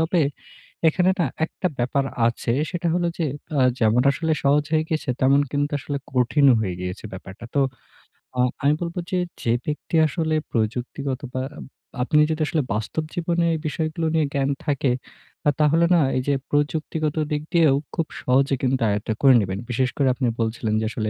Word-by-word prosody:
তবে 165 +2 +2 0.7
এখানে 180 +3 +3
না 170 - +4 0.2
একটা 175 - -4
ব্যাপার 135 +3 +1 0.2
আছে, 120 0 -1 0.2
সেটা 175 -1 -1
হলো 175 -1 +1
যে, 165 - +1 0.3
আ - - +4 0.2
যেমন 115 +1 +3
আসলে 160 +3 -1
সহজ 145 +1 +3
হয়ে 155 0 +3
গেছে, 155 -3 -2
তেমন 135 +2 +5
কিন্তু 145 +1 -1
আসলে 140 0 -4
কঠিন 130 +3 +3
হয়ে 95 -5 -2
গিয়েছে 90 +3 -5
ব্যাপারটা। 95 +3 -9
তো 140 - +3 0.8
আ - - -1 0.2
আমি 145 +1 +4
বলব 170 0 -3 0.2
যে, 185 - +1 0.2
যে, 115 - 0
ব্যক্তি 150 +2 -3
আসলে 160 +1 -1 0.2
প্রযুক্তিগত 125 +4 -2
বা 130 - -1 0.6
আপনি 150 +4 +3
যদি 155 - -2
আসলে 155 -2 +1
বাস্তব 110 +9 -2
জীবনে 170 0 0
এই 160 - -1
বিষয়গুলো 160 +2 -2
নিয়ে 160 -2 +3
জ্ঞান 140 -1 +1 0.2
থাকে, 140 -3 +1 0.6
আ - - +7
তাহলে 155 +3 +4
না 170 - +5 0.2
এই - - +1
যে, 145 - +3 0.2
প্রযুক্তিগত 150 +1 0 0.2
দিক 150 - 0
দিয়েও 160 -5 +5 0.2
খুব 165 -3 0
সহজে 135 +2 +2
কিন্তু 130 -1 +1
আয়ত্ত 105 +1 -2
করে 135 -2 +7
নিবেন। 95 -1 -3
বিশেষ 125 +1 +1
করে 140 - +3
আপনি 125 0 -1
বলছিলেন 110 -1 -1
যে, - - -1
আসলে 110 -1 -2
145 Hz, 175 wpm, -23 LUFS, 125-160 Hz, 0.8 s, আ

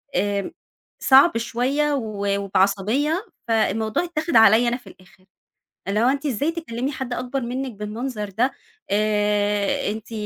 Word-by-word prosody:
آمم، 200 +1 -1 0.5
صعب 270 +1 +6
شوية 265 +6 0
و 215 -6 -3
وبعصبية، 205 - +1 0.2
فالموضوع 220 - +1
اتّاخد 335 -3 -3
عليّا 225 +1 +6
أنا 240 - -1
في 245 - -20
الآخر 185 0 -18 0.6
اللي 205 +2 0
هو: 240 - +4
"أنتِ 280 +2 -1
إزاي 285 +3 0
تكلمي 275 -6 -4
حد 260 -3 -5
أكبر 250 +2 -3
منِّك 255 +2 -3
بالمنظر 210 +1 -5
ده؟ 235 +7 0 0.4
آآ، 205 -1 +1
أنتِ 220 +1 -8
230 Hz, 135 wpm, -22 LUFS, 205-270 Hz, 0.6 s, صعب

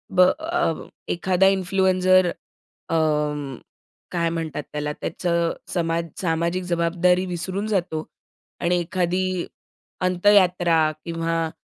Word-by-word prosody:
ब - - +1
अ, 315 - +2 0.3
एखादा 185 +2 +2
इन्फ्लुएन्सर 185 -1 +3 0.6
अं, 150 -4 0 0.5
काय 170 -1 0
म्हणतात 160 -3 -3
त्याला, 150 0 -2
त्याचं 170 +1 -1 0.2
समाज 165 -1 0 0.2
सामाजिक 170 +1 0
जबाबदारी 180 +1 +2
विसरून 185 +3 -3
जातो. 175 -6 -1 0.6
आणि 180 +1 +1
एखादी 180 +1 -1 0.6
अंत्ययात्रा 180 -4 +4
किंवा 165 -1 -1
175 Hz, 95 wpm, -23 LUFS, 165-185 Hz, 0.6 s, अंत्ययात्रा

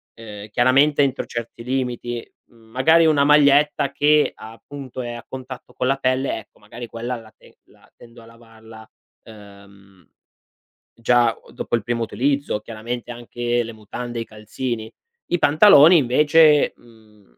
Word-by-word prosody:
Ehm, 105 -2 -11
chiaramente 135 +5 +3
entro 135 -1 -2
certi 115 0 -7
limiti. 125 -2 -4 0.2
Mhmm, 115 -1 -23
magari 160 +7 +4
una 150 -3 +3
maglietta 145 -1 +3
che, 150 +1 +2
appunto, 130 +4 -10
è 120 - -6
a 120 - -9
contatto 130 -1 -10
con 125 - -3
la 135 +1 +1
pelle, 130 -1 -1
ecco, - - -19
magari 115 +3 -10
quella 120 +2 -5
la 115 -2 -12
te - - -22
la - - -25
tendo 120 0 -16
a - - -16
lavarla, 115 -1 -16 0.3
uhm, 100 -3 -17 0.8
già 120 0 +2
o - - -20
dopo - - -3
il 115 - -3
primo 120 +1 -2
utilizzo. 140 -1 -1
Chiaramente 115 +2 -7
anche 120 0 -3
le 115 - -8
mutande 115 +3 -7
e - - -3
i - - -6
calzini. 110 +1 -6 0.4
I 175 - 0
pantaloni 155 +1 +6
invece, 150 +3 +4
mhmm, 110 - -23
120 Hz, 150 wpm, -21 LUFS, 110-135 Hz, 0.8 s, pantaloni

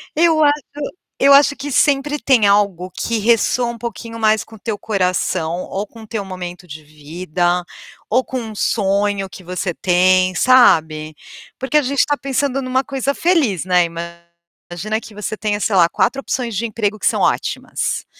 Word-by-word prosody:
Eu 320 -1 +4
acho 290 0 +3 0.6
eu 280 +1 +6
acho 285 0 +5
que 285 +1 -6
sempre 290 +2 +2
tem 240 -4 +3
algo 200 -3 +2
que 230 +4 -2
ressoa 235 +2 +2
um 235 - -9
pouquinho 230 0 -7
mais 215 -1 +2
com 220 - -15
o 215 - -15
teu 210 +1 -4
coração, 180 -4 -1
ou 200 +2 -5
com 225 -1 -14
o - - -13
teu 215 -2 -4
momento 180 -1 -8
de 155 -1 -10
vida, 175 +4 -2 0.4
ou 255 +4 +2
com 255 +2 -4
um 225 -2 -7
sonho 200 -1 0
que 190 0 -12
você 180 +1 -3
tem, 185 +1 +2
sabe, 155 -12 +3 0.4
porque 265 +2 -4
a 300 - +5
gente 280 +1 -3
está 290 -1 +1
pensando 275 0 -1
numa 260 0 0
coisa 275 0 -2
feliz, 280 - +1
né, 180 -1 +3
imagina 170 +4 -7
que 215 - -13
você 210 +1 -4
tenha, 210 -1 -2
sei 210 -1 0
lá, 170 -2 +5
4 275 - 0
opções 240 -5 -3
de 230 +4 -1
emprego 215 -1 -2
que - - 0
são - - +1
ótimas. - - -1
210 Hz, 180 wpm, -18 LUFS, 180-255 Hz, 0.6 s, eu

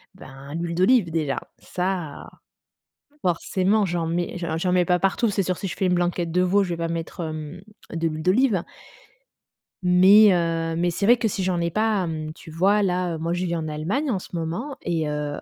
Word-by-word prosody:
Ben, 140 -4 -11
l'huile 170 0 -3
d'olive, 190 +1 +4
déjà, 155 -4 -1 0.2
ça, 180 -5 -4 0.9
forcément, 190 +4 +1
j'en 170 -2 -2
mets 175 +2 -2
j'en 165 -2 -3
j'en 180 +3 0
mets 180 -1 +3
pas 180 0 +1
partout. 195 +4 +1
C'est 200 -1 0
sûr, 185 0 -1
si - - -4
je 185 - -4
fais 190 - 0
une 180 - +2
blanquette 175 -1 0
de 180 +2 +2
veau, 190 +3 +3
je 185 - -3
vais 170 - -1
pas 165 0 -2
mettre, 165 +1 -5
hem, 155 +2 -6 0.3
de 165 0 -1
l'huile 155 0 -5
d'olive 195 +1 +2 1.2
mais 190 +4 +7
heu, 165 -1 0
mais 175 +1 +1
c'est 185 +4 -2
vrai 240 +3 +6
que 230 - 0
si 195 -2 -2
j'en 180 -1 0
ai 170 0 -1
pas, 215 -1 +1
mmh, 155 -1 -4
tu 160 - -13
vois? 195 +6 +3
Là, 180 -3 0
moi 165 +2 -2
je 175 +1 -1
vis 170 -1 -1
en 160 -1 -3
Allemagne 185 - -2
en 195 - 0
ce - - -12
moment 175 - -4
et 160 -3 -1
heu, 150 -1 -3
en - - -9
175 Hz, 215 wpm, -24 LUFS, 165-190 Hz, 1.2 s, mais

